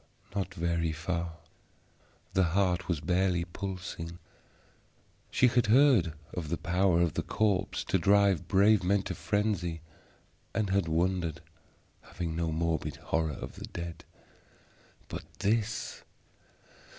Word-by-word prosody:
Not 95 -2 -1
very 85 -1 0
far; 85 +1 -3 1.0
the 95 - +3 0.2
heart 95 -2 +2
was 85 -5 -1
barely 90 0 +1
pulsing. 90 -2 -6 1.1
She - - +3
had 120 -2 +2
heard 120 - +5 0.2
of 80 -4 -4
the 85 - -1
power 90 -1 +2
of 85 -3 +2
the - - -1
corpse 100 -3 0
to - - +1
drive 100 -3 +4
brave 100 +1 +5
men 100 +2 +2
to - - -3
frenzy, 100 -6 -1 0.7
and 105 -3 0
had 100 -3 +2
wondered, 85 0 0 0.6
having 85 -2 -5
no 85 -1 -1
morbid 80 0 -1
horror 80 -2 -1
of - - -8
the - - -6
dead. 85 -1 -7 1.0
But - - -6
this! 110 +2 -1
90 Hz, 125 wpm, -30 LUFS, 85-100 Hz, 1.1 s, heard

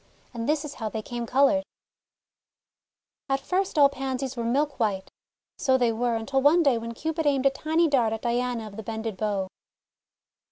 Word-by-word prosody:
And 230 +2 -3
this 305 0 +1
is 290 - -6
how 220 -5 -4
they 220 0 -5
came 240 0 -5
coloured: 280 +3 +3 0.7
— - - -66
At 270 0 +1
first 370 +5 -1
all 285 -1 +8
Pansies 265 -1 -4
were 235 - -3
milk 280 +5 0
white. 200 -4 -1 0.5
So 260 -2 +3
they 240 -2 +2
were, 235 +1 0
until 265 +5 0
one 315 +5 +5
day 265 -6 +3
when 230 0 -6
Cupid 320 +3 -2
aimed 275 -2 +2
a 275 - +6
tiny 320 +4 +1
dart 250 -7 +2
at 225 0 -4
Diana 240 -1 -1
of 210 -1 -10
the - - -4
Bended 220 -1 -4
Bow. 200 -2 -1
255 Hz, 190 wpm, -26 LUFS, 230-285 Hz, 0.7 s, all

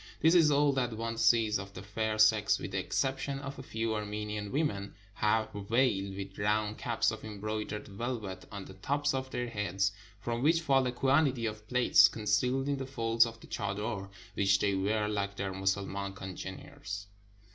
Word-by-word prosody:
This 160 +1 +5
is 165 -4 +6
all 145 0 +4
that 125 -3 0
one 115 0 -3
sees 115 -2 +3
of 100 0 -9
the 90 - -7
fair 110 +2 -2
sex, 110 -1 +5
with - - -6
the - - -1
exception 135 +1 -1
of 135 0 -7
a - - -5
few 115 -3 -2
Armenian 105 -1 -4
women, 105 -10 -1 0.2
half 110 +1 +1
veiled, 100 -2 +1
with 95 0 -7
round 105 +1 0
caps 115 -3 +1
of 110 - -7
embroidered 105 0 -4
velvet 100 -3 -5
on 100 -2 -6
the - - -11
tops 145 +9 0
of 130 0 -2
their 125 -2 -3
heads, 100 -3 0 0.3
from 120 +3 -3
which 165 +4 +4
fall 135 -4 +3
a - - 0
quantity 135 -1 +2
of 105 -1 -5
plaits, 125 -6 +6
concealed 115 +7 0
in 140 -1 0
the 135 -1 -5
folds 115 -3 +3
of 115 0 -9
the - - -12
chader, 100 0 -3 0.2
which 100 -1 +3
they 100 0 +1
wear 105 +3 +1
like 100 -1 -2
their 100 -1 -3
Mussulman 95 +1 -1
congeners. 100 +4 -7
110 Hz, 180 wpm, -31 LUFS, 100-125 Hz, 0.3 s, is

